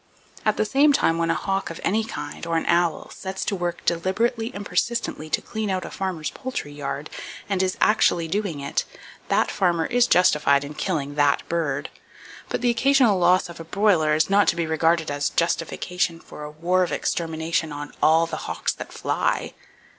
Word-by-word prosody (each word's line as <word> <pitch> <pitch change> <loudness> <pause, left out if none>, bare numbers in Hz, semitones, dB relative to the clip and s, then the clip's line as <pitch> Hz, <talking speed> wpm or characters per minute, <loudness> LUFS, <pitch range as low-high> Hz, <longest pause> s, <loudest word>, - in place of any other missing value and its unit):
At - - +2
the - - +2
same 285 +6 +4
time, 165 -10 +2
when 165 0 +1
a 165 - +2
hawk 195 +4 -2
of 165 - -7
any 220 +3 +1
kind, 145 -5 -6
or 165 0 +1
an 165 - -1
owl, 170 -2 +1
sets 190 0 -5
to 205 - -1
work 175 -1 -3
deliberately 225 +7 0
and 205 -4 -7
persistently 190 -5 -1
to - - 0
clean 220 -2 -3
out 185 -1 -1
a - - -8
farmer's 185 -5 -3
poultry 255 - -5
yard, 145 0 -4 0.4
and 195 -2 0
is 185 0 0
actually 175 -5 +3
doing 190 -5 -2
it, 140 - -1 0.4
that - - +2
farmer 170 -3 +1
is 245 +3 +3
justified 150 -7 +4
in 145 +1 -7
killing 150 -3 -2
that 145 -1 +2
bird. 150 -4 -1 0.6
But, - - -2
the 245 -1 +3
occasional 240 -4 +4
loss 180 +1 +4
of 170 -1 -11
a - - -6
broiler 165 -4 +2
is 155 - +2
not 200 +1 +4
to - - +3
be 170 -1 -1
regarded 160 0 +1
as 145 0 0
justification 170 0 -1
for 150 - -11
a - - -6
war 170 +5 0
of 175 -4 0
extermination 160 0 -1
on 145 0 -7
all 160 +2 +5
the 165 - -5
hawks 80 0 -1
that - - -9
fly! - - -1
170 Hz, 190 wpm, -24 LUFS, 155-195 Hz, 0.6 s, all